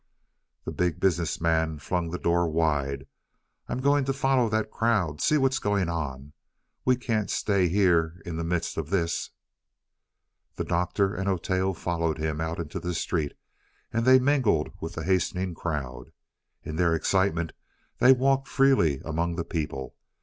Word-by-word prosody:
The -, -, -3 dB
Big 90 Hz, -2 st, -1 dB
Business 85 Hz, -3 st, +1 dB
Man 80 Hz, -1 st, +1 dB
flung 85 Hz, +4 st, -2 dB
the 90 Hz, -, -3 dB
door 85 Hz, 0 st, +1 dB
wide. 75 Hz, -4 st, 0 dB, 0.6 s
"I'm -, -, -2 dB
going 140 Hz, +1 st, +3 dB
to 135 Hz, -, 0 dB
follow 135 Hz, -3 st, +2 dB
that 110 Hz, 0 st, -1 dB
crowd. 95 Hz, -10 st, 0 dB
See 155 Hz, -, +3 dB
what's 135 Hz, -1 st, +2 dB
going 100 Hz, -4 st, 0 dB
on. 70 Hz, -4 st, -4 dB, 0.5 s
We 125 Hz, -, +4 dB
can't 115 Hz, -4 st, -1 dB
stay 100 Hz, -3 st, +1 dB
here 85 Hz, -3 st, +2 dB
in 85 Hz, -3 st, -5 dB
the 85 Hz, -, -2 dB
midst 85 Hz, 0 st, -2 dB
of 80 Hz, -2 st, -3 dB
this." 85 Hz, -3 st, -1 dB, 1.3 s
The -, -, -2 dB
Doctor 95 Hz, +3 st, 0 dB
and 95 Hz, 0 st, -3 dB
Oteo 95 Hz, +1 st, 0 dB
followed 85 Hz, -2 st, -1 dB
him 80 Hz, 0 st, -2 dB
out 80 Hz, +1 st, -2 dB
into 80 Hz, -3 st, -5 dB
the 90 Hz, -1 st, -3 dB
street, 80 Hz, -3 st, -1 dB, 0.6 s
and 115 Hz, +1 st, +1 dB
they 130 Hz, +2 st, +7 dB
mingled 130 Hz, -, +2 dB
with 80 Hz, -, -5 dB
the 80 Hz, -, -4 dB
hastening 95 Hz, 0 st, 0 dB
crowd. 75 Hz, -7 st, -5 dB, 0.5 s
In 80 Hz, -, -5 dB
their 85 Hz, -2 st, +3 dB
excitement 85 Hz, -1 st, +1 dB, 0.5 s
they 130 Hz, -, +7 dB
walked 135 Hz, +1 st, +3 dB
freely 130 Hz, -, +3 dB
among 85 Hz, +2 st, -1 dB
the 85 Hz, -1 st, -3 dB
people. 75 Hz, -5 st, -4 dB
85 Hz, 155 wpm, -27 LUFS, 80-105 Hz, 1.3 s, they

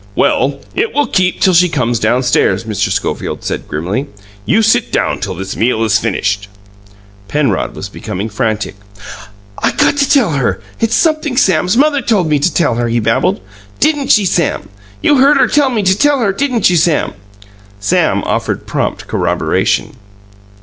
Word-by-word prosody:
"Well, 140 Hz, +1 st, +1 dB
it 445 Hz, +3 st, -2 dB
will 290 Hz, 0 st, +2 dB
keep 185 Hz, -2 st, 0 dB
till 190 Hz, -, +4 dB
she 180 Hz, +1 st, +4 dB
comes 120 Hz, -6 st, -1 dB
downstairs," 125 Hz, 0 st, +1 dB
Mr. 110 Hz, -3 st, -2 dB
Schofield -, -, -3 dB
said -, -, -4 dB
grimly. 95 Hz, -, -3 dB, 0.4 s
"You 220 Hz, +3 st, +3 dB
sit 230 Hz, +2 st, +2 dB
down -, -, 0 dB
till 95 Hz, -2 st, -4 dB
this 95 Hz, +2 st, -6 dB
meal 115 Hz, 0 st, 0 dB
is 110 Hz, -1 st, +2 dB
finished." 105 Hz, -2 st, -2 dB, 0.8 s
Penrod 135 Hz, -5 st, -1 dB
was -, -, -6 dB
becoming 95 Hz, +4 st, -5 dB
frantic. 110 Hz, 0 st, -2 dB, 0.9 s
"I -, -, +2 dB
got 285 Hz, -, +2 dB
to 280 Hz, -2 st, +1 dB
tell 255 Hz, -, +3 dB
her 125 Hz, -10 st, -1 dB, 0.2 s
it's 225 Hz, 0 st, +1 dB
sumpthing 310 Hz, -5 st, 0 dB
Sam's 185 Hz, -, +2 dB
mother 290 Hz, 0 st, +3 dB
told 205 Hz, -9 st, +1 dB
me 150 Hz, -1 st, +2 dB
to 160 Hz, +5 st, +1 dB
tell 160 Hz, -7 st, +1 dB
her," 120 Hz, 0 st, 0 dB
he 120 Hz, +1 st, 0 dB
babbled. 115 Hz, -3 st, 0 dB, 0.4 s
"Didn't 295 Hz, -2 st, +1 dB
she, 210 Hz, -3 st, +4 dB
Sam? 170 Hz, -, -1 dB, 0.3 s
You 290 Hz, -, +4 dB
heard 280 Hz, +2 st, +5 dB
her 270 Hz, -, +4 dB
tell 285 Hz, -2 st, +2 dB
me 225 Hz, -5 st, -1 dB
to 190 Hz, 0 st, +3 dB
tell 290 Hz, +6 st, +2 dB
her; 215 Hz, -6 st, 0 dB
didn't 250 Hz, -1 st, +1 dB
you, 175 Hz, -, +2 dB
Sam?" 160 Hz, -1 st, +1 dB, 0.7 s
Sam 105 Hz, 0 st, +1 dB
offered -, -, -2 dB
prompt -, -, -3 dB
corroboration. -, -, -1 dB
170 Hz, 170 wpm, -14 LUFS, -, 0.9 s, heard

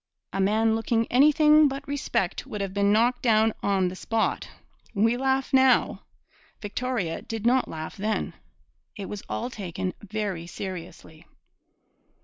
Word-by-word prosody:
A 195 Hz, -, 0 dB
man 220 Hz, +3 st, +2 dB
looking 225 Hz, +1 st, 0 dB
anything 300 Hz, +3 st, +6 dB
but 275 Hz, +1 st, -5 dB
respect 280 Hz, -10 st, -2 dB
would 210 Hz, -, -6 dB
have 195 Hz, -1 st, -3 dB
been 200 Hz, 0 st, +2 dB
knocked 240 Hz, +4 st, +2 dB
down 220 Hz, -2 st, +3 dB
on 195 Hz, -2 st, +1 dB
the 180 Hz, -, -5 dB
spot. 225 Hz, +4 st, -1 dB, 0.5 s
We 225 Hz, +4 st, +3 dB
laugh 265 Hz, +1 st, 0 dB
now! 260 Hz, -1 st, +4 dB, 0.6 s
Victoria 205 Hz, -5 st, -3 dB
did 225 Hz, -1 st, -6 dB
not 255 Hz, +2 st, +3 dB
laugh 160 Hz, 0 st, -7 dB
then. 210 Hz, 0 st, -2 dB, 0.6 s
It 200 Hz, -, -6 dB
was 205 Hz, -2 st, -6 dB
all 245 Hz, +2 st, -3 dB
taken 185 Hz, -3 st, -4 dB
very 205 Hz, -5 st, -4 dB
seriously. 170 Hz, -3 st, -8 dB
220 Hz, 135 wpm, -26 LUFS, 195-250 Hz, 0.6 s, anything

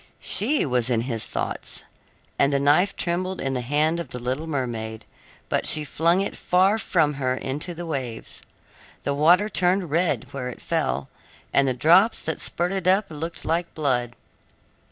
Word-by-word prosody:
She 275 Hz, +9 st, +2 dB
was 125 Hz, -3 st, 0 dB
in 115 Hz, -2 st, +1 dB
his 115 Hz, -2 st, -3 dB
thoughts, -, -, -4 dB, 0.6 s
and 140 Hz, -, +4 dB
the 140 Hz, -, +2 dB
knife 145 Hz, +8 st, +3 dB
trembled 185 Hz, +2 st, -2 dB
in 135 Hz, 0 st, -2 dB
the 125 Hz, -, -1 dB
hand 150 Hz, +6 st, +1 dB
of 170 Hz, -, -5 dB
the -, -, -6 dB
little 130 Hz, +6 st, -3 dB
mermaid 115 Hz, -7 st, -4 dB, 0.4 s
but -, -, 0 dB
she 155 Hz, -, +4 dB
flung 170 Hz, +5 st, +2 dB
it 200 Hz, -, -3 dB
far 190 Hz, +4 st, +2 dB
from 160 Hz, -8 st, +1 dB
her 130 Hz, -1 st, +1 dB
into 150 Hz, +7 st, -4 dB
the 175 Hz, +1 st, -6 dB
waves. 130 Hz, -8 st, -5 dB, 0.6 s
The 140 Hz, -, 0 dB
water 170 Hz, +8 st, +4 dB
turned 185 Hz, -4 st, +1 dB
red 170 Hz, +2 st, 0 dB
where 130 Hz, -2 st, -4 dB
it 125 Hz, -, -9 dB
fell, 65 Hz, +2 st, -1 dB, 0.5 s
and 140 Hz, 0 st, +4 dB
the 130 Hz, -, 0 dB
drops 175 Hz, -, +4 dB
that 160 Hz, -, -2 dB
spurted 180 Hz, +1 st, -1 dB
up 190 Hz, 0 st, +3 dB
looked 160 Hz, +2 st, -6 dB
like 170 Hz, +1 st, -1 dB
blood. 125 Hz, -5 st, 0 dB
155 Hz, 170 wpm, -24 LUFS, 130-175 Hz, 0.6 s, and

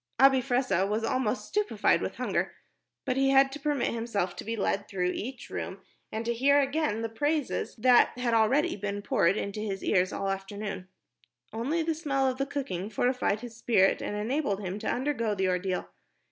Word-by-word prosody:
Abi 270 Hz, -1 st, +6 dB
Fressah 250 Hz, -7 st, +1 dB
was 215 Hz, +2 st, -1 dB
almost 250 Hz, 0 st, 0 dB
stupified 420 Hz, 0 st, +1 dB
with -, -, -3 dB
hunger, -, -, -1 dB, 0.5 s
but 255 Hz, -, 0 dB
he 270 Hz, 0 st, +3 dB
had 270 Hz, 0 st, +5 dB
to 290 Hz, -, -7 dB
permit 295 Hz, -4 st, 0 dB
himself 220 Hz, -6 st, -2 dB
to -, -, -7 dB
be 225 Hz, +1 st, -3 dB
led 200 Hz, -1 st, -1 dB
through 180 Hz, -3 st, -1 dB
each 255 Hz, +3 st, -6 dB
room -, -, -5 dB, 0.3 s
and 220 Hz, +1 st, -3 dB
to 235 Hz, -, +1 dB
hear 280 Hz, +4 st, +4 dB
again 275 Hz, -6 st, 0 dB
the -, -, 0 dB
praises 290 Hz, +5 st, -1 dB
that 245 Hz, +1 st, +4 dB
had 245 Hz, -2 st, 0 dB
already 230 Hz, +6 st, +3 dB
been 205 Hz, 0 st, -4 dB
poured 185 Hz, 0 st, +2 dB
into 200 Hz, 0 st, -3 dB
his 200 Hz, -3 st, -4 dB
ears 185 Hz, 0 st, +2 dB
all 195 Hz, -, -3 dB
the 195 Hz, -, +1 dB
afternoon. 195 Hz, -1 st, -6 dB, 0.7 s
Only 280 Hz, +9 st, -1 dB
the 325 Hz, 0 st, 0 dB
smell 280 Hz, -4 st, 0 dB
of 260 Hz, 0 st, -2 dB
the 275 Hz, -, 0 dB
cooking 210 Hz, -10 st, -3 dB
fortified 235 Hz, -2 st, 0 dB
his 240 Hz, -2 st, -8 dB
spirit 220 Hz, -4 st, +3 dB
and 205 Hz, -, -3 dB
enabled 215 Hz, -1 st, -1 dB
him 190 Hz, +1 st, -4 dB
to 220 Hz, -, -2 dB
undergo 245 Hz, -5 st, -1 dB
the 190 Hz, -1 st, +1 dB
ordeal. 180 Hz, 0 st, -1 dB
230 Hz, 190 wpm, -28 LUFS, 205-270 Hz, 0.7 s, Abi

